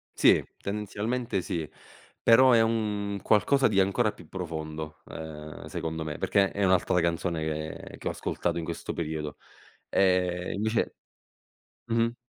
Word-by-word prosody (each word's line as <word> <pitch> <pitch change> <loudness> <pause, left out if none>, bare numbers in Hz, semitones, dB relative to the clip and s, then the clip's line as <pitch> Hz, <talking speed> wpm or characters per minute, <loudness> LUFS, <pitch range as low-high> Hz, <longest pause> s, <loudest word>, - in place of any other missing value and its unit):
Sì, - - +6 0.2
tendenzialmente 105 +2 -2
sì, 80 -3 -3 0.5
però 130 +3 +7
è 115 - +6
un 105 -3 0
qualcosa 130 +6 +4
di 100 -3 +2
ancora 95 0 +3
più - - -15
profondo, 80 -3 -5
uhm, 75 -1 -8
secondo 80 0 -4
me, 75 -1 -5
perché 100 -1 +3
è 100 - -1
un'altra 90 -1 +3
canzone, 85 0 0 0.4
che - - -10
che - - -6
ho - - +1
ascoltato 85 - -2
in - - -4
questo 85 0 -4
periodo. 75 -2 -4 0.5
Ehm, 90 -2 +2
invece 110 +3 0 0.9
mh-mh. 115 0 +1
95 Hz, 135 wpm, -28 LUFS, 80-105 Hz, 0.9 s, però